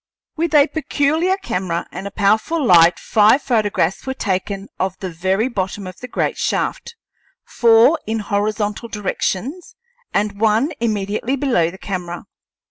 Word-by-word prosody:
With 330 -1 -1
a 285 -1 +7
peculiar 315 +4 0
camera 180 - -3
and 195 - -6
a - - -4
powerful 220 +10 +1
light 170 -4 +6
five 220 +5 +3
photographs 210 -5 0
were 265 - -2
taken 195 -1 -3
of 190 0 -1
the 185 -2 -5
very 190 +7 0
bottom 195 -4 -3
of 185 -1 -9
the 250 - -7
great - - -2
shaft, 470 - -2 0.5
four 235 +7 +4
in 225 +1 -1
horizontal 210 +1 -2
directions 220 - -3 0.4
and 200 0 -1
one 225 +7 +2
immediately 215 +3 -1
below 250 - +1
the 185 - -11
camera. 180 -3 -5
210 Hz, 140 wpm, -19 LUFS, 190-260 Hz, 0.5 s, a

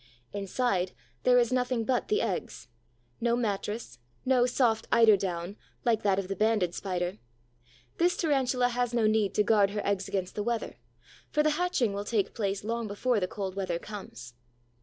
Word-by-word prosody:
Inside, 195 -2 -1 0.3
there 250 0 +5
is 240 0 +3
nothing 250 -2 0
but 250 0 0
the 425 +2 +1
eggs: - - -4 0.5
no 235 0 +2
mattress, 210 - -3 0.3
no 255 -1 +4
soft 240 -3 +1
eider 225 -2 +7
down, 185 0 -4 0.3
like 230 -2 +2
that 195 -2 +2
of 195 -1 -2
the 195 - -3
Banded 210 -5 +1
Spider. 180 0 -3 0.8
This 350 +1 +3
Tarantula 260 -6 +2
has 245 0 -1
no 230 -2 +3
need 215 -2 +2
to 210 - +4
guard 205 -2 +4
her 210 +1 -4
eggs 200 -1 0
against 185 -2 -2
the 210 - -3
weather, 235 +1 -2 0.5
for 300 - +2
the 305 - +3
hatching 300 - +1
will 200 +1 -3
take 205 -2 0
place 200 -3 -2
long 230 +1 -2
before 215 +3 0
the 185 - -1
cold 190 -1 -5
weather 185 -3 -1
comes. 125 - -9
215 Hz, 175 wpm, -29 LUFS, 195-245 Hz, 0.8 s, eider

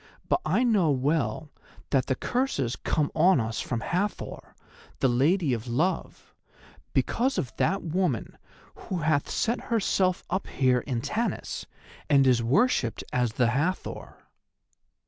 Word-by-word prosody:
But - - +1
I 195 +10 +2
know 210 -9 +3
well 140 0 0 0.4
that 135 -3 +2
the 130 - +1
curses 240 - -1
come 150 -3 -1
on 170 0 +4
us 110 -1 -2
from 120 -3 -3
Hathor, 200 - -3 0.4
the - - +3
Lady 140 +5 +2
of 115 0 -4
Love, 155 +11 -2 0.6
because 260 +3 +1
of 125 - -3
that 195 +4 +1
woman 170 - -1 0.4
who 180 -3 -5
hath 150 -2 +1
set 235 +2 -1
herself 195 -5 +1
up 190 - -2
here 130 -2 +2
in 120 -2 -3
Tanis, 230 - -3 0.4
and 140 -2 +5
is 125 -2 +4
worshipped 125 - +1
as 125 -3 +1
the 120 0 +2
Hathor." 155 +9 -2
150 Hz, 135 wpm, -27 LUFS, 125-190 Hz, 0.6 s, and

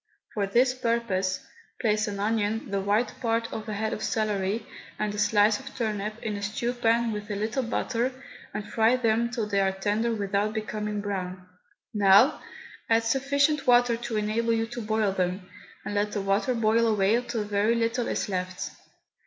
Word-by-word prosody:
For 200 -2 0
this 250 +5 +3
purpose, 230 -7 -1 0.3
place 215 -1 +1
an 200 -1 -4
onion, 215 +1 -1
the 200 -1 0
white 205 +5 +1
part 230 -1 0
of 220 0 -5
a - - -2
head 220 +1 -1
of - - -5
celery, 210 -1 -1 0.3
and 210 -1 -1
a 205 - -4
slice 210 +1 +4
of 270 0 -11
turnip 215 -3 -2
in 215 -2 -2
a 205 - -5
stew 220 +4 -2
pan 235 -1 +2
with 210 0 -5
a 205 - -2
little 220 +6 -1
butter, 240 +1 -1 0.4
and 210 - -5
fry 225 +2 +3
them 235 -1 +1
till 240 -3 -2
they 200 -1 0
are 195 -1 +2
tender 210 +4 0
without 205 -1 0
becoming 210 0 -3
brown. 185 -2 -4 0.5
Now 205 +6 +5 0.5
add 225 0 +4
sufficient 280 +4 +1
water 245 -1 +5
to 235 -1 -4
enable 220 +2 +1
you 225 0 +1
to 240 - -4
boil 215 -2 +1
them, 185 0 -2 0.4
and - - -3
let 205 0 0
the 205 - -1
water 195 +6 +1
boil 230 +1 +3
away 215 +2 +3
till 240 -3 -3
very 210 +2 +1
little 230 +1 0
is - - -1
left. 185 -2 -3
215 Hz, 180 wpm, -27 LUFS, 205-230 Hz, 0.5 s, Now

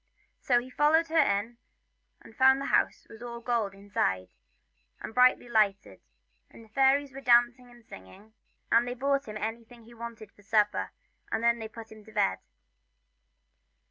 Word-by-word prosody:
So 245 -2 +2
he 255 +2 -10
followed 315 +4 +2
her 325 0 +2
in, 205 +2 +1 0.7
and 225 - -16
found 265 +1 +5
the 275 - -4
house - - +1
was 225 - -14
all 235 -1 -7
gold 230 -5 -2
inside 195 - -2
it, 90 - -24 0.7
and - - -8
brightly 250 0 +4
lighted, 210 -4 0 0.5
and 230 - -15
the - - -23
fairies 270 +3 +2
were 275 - -9
dancing 245 0 +3
and 240 -1 -19
singing, 95 - -14 0.4
and 235 +1 +4
they 245 - -4
brought 275 +2 -1
him 215 0 -6
anything 230 +2 -7
he 235 +2 -16
wanted 230 -2 -9
for - - -22
supper, 210 0 +1 0.4
and 225 +1 -2
then 235 0 +2
they 220 - -6
put 225 0 -12
him 215 -1 -13
to 220 - -15
bed. 95 - 0
235 Hz, 175 wpm, -28 LUFS, 215-250 Hz, 0.7 s, found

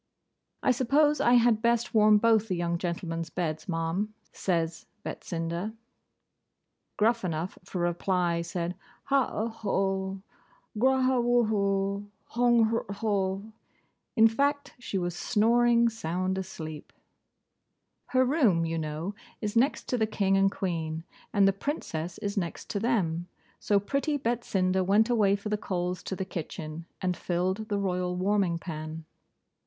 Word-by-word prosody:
'I - - +4
suppose 290 +5 +3
I 240 - +4
had 235 -2 +4
best 235 0 +1
warm 215 -1 +6
both 225 0 +3
the 185 - -1
young 170 0 -1
gentlemen's 170 -2 -3
beds, 155 -1 -3
Ma'am,' 170 +6 -1 0.2
says 165 -3 -1 0.2
Betsinda. 170 +5 -4 1.2
Gruffanuff, 190 -7 0
for 180 -1 -4
reply, 175 0 +1
said, 170 +1 -3 0.3
'Hau 275 -2 +2
au 220 - -1
ho! 195 -3 -1 0.6
Grauhawhoo! 220 -6 +2 0.2
Hong 235 -2 +3
hrho!' 200 -2 -1 0.6
In 225 -2 +7
fact, 285 +5 0
she 225 -5 -3
was 175 -1 -2
snoring 235 +3 +3
sound 185 -3 -2
asleep. 155 -5 -7 1.2
Her 260 0 +3
room, 240 - +3
you 165 0 -2
know, 155 +5 -3 0.3
is 210 -1 -3
next 260 +6 +2
to 250 - 0
the 220 - +2
King 195 -2 +1
and 195 0 +4
Queen, 160 -4 -3 0.3
and 200 -2 +4
the 195 - +4
Princess 180 - -4
is 205 -1 -3
next 175 -5 -3
to 200 - -1
them. 180 -7 0 0.3
So 205 -1 +2
pretty 280 +8 -1
Betsinda 195 -7 0
went 210 +5 +3
away 205 -4 +4
for 205 +1 -5
the 210 - +1
coals 180 -3 -2
to 190 - -3
the 190 - -3
kitchen, 165 -2 -6
and 180 -1 0
filled 185 +6 -1
the 205 - 0
royal 180 -2 -1
warming 190 -2 +1
pan. 160 -1 -6
195 Hz, 135 wpm, -28 LUFS, 175-225 Hz, 1.2 s, In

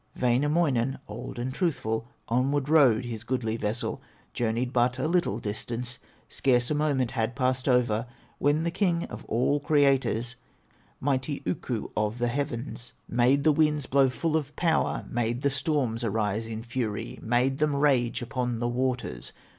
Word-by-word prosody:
Wainamoinen, 135 0 +2
old 110 +4 -7
and 125 +2 -3
truthful, 115 - -1 0.2
Onward 135 +4 +1
rowed 130 -7 +5
his 115 -2 -5
goodly 115 -2 -1
vessel, 105 -1 -2 0.3
Journeyed 120 +2 -1
but 125 0 +2
a 130 - 0
little 170 - +1
distance, 120 +3 -4 0.3
Scarce 125 -1 +1
a - - +3
moment 145 -5 +1
had 115 -1 -1
passed 130 0 0
over, 120 -2 +2 0.3
When 145 +3 +2
the 170 - 0
King 175 -2 +1
of - - -7
all 125 +5 +1
creators, 135 -5 +2 0.7
Mighty 140 +1 -1
Ukko 125 -8 -3
of 105 +2 0
the 120 0 0
heavens, 125 -2 -4
Made 130 +4 +3
the 155 - +5
winds 150 -1 +2
blow 135 0 +4
full 155 +5 -1
of 145 -2 -2
power, 165 -2 +1
Made 120 +2 -1
the 140 - +3
storms 135 -5 0
arise 110 0 -1
in 110 0 -5
fury, 115 -3 -3
Made 125 +4 +1
them 150 -1 +2
rage 130 -5 +2
upon 125 -1 -2
the 120 - 0
waters. 125 - -2
125 Hz, 155 wpm, -27 LUFS, 115-145 Hz, 0.7 s, rowed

